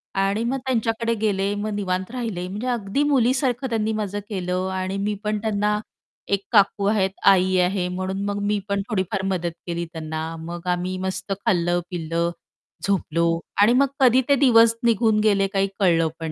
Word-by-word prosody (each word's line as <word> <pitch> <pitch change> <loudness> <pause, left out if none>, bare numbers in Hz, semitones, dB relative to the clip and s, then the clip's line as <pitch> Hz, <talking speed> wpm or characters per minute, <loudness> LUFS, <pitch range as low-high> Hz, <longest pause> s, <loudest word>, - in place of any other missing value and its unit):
आणि 195 +3 +1
मग 260 +3 -1
त्यांच्याकडे 230 -2 0
गेले, 200 -1 +1
मग 210 +1 -3
निवांत 190 0 -2
राहिले. 220 -8 -4
म्हणजे 210 +7 -5
अगदी 240 +3 0
मुलीसारखं 260 0 +1
त्यांनी 220 -1 0
माझं 205 -1 -3
केलं 185 -1 -2
आणि 190 +1 -2
मी 205 +1 -1
पण 210 0 0
त्यांना 210 -1 0 0.5
एक 200 0 +2
काकू 200 -1 +3
आहेत, 200 -2 +2 0.2
आई 185 -1 +5
आहे 180 0 +1
म्हणून 185 +2 -3
मग 205 0 -2
मी 210 0 +1
पण 200 0 0
थोडीफार 190 -2 -1
मदत 175 -3 -1 0.2
केली 170 0 -2
त्यांना. 160 0 -5
मग 170 +2 -7
आम्ही 180 +1 -1
मस्त 190 +1 -4
खाल्लं-पिल्लं, 170 -1 0 0.6
झोपलो. 170 -3 +1 0.2
आणि 225 +4 +6
मग 275 +2 +4
कधी 255 0 +5
ते 280 - +6
दिवस 230 -4 +5
निघून 225 -2 +3
गेले 200 -2 +3
काही 195 0 +2
कळलं 165 -4 +3
पण 160 -1 -4
195 Hz, 165 wpm, -23 LUFS, 180-220 Hz, 0.6 s, आणि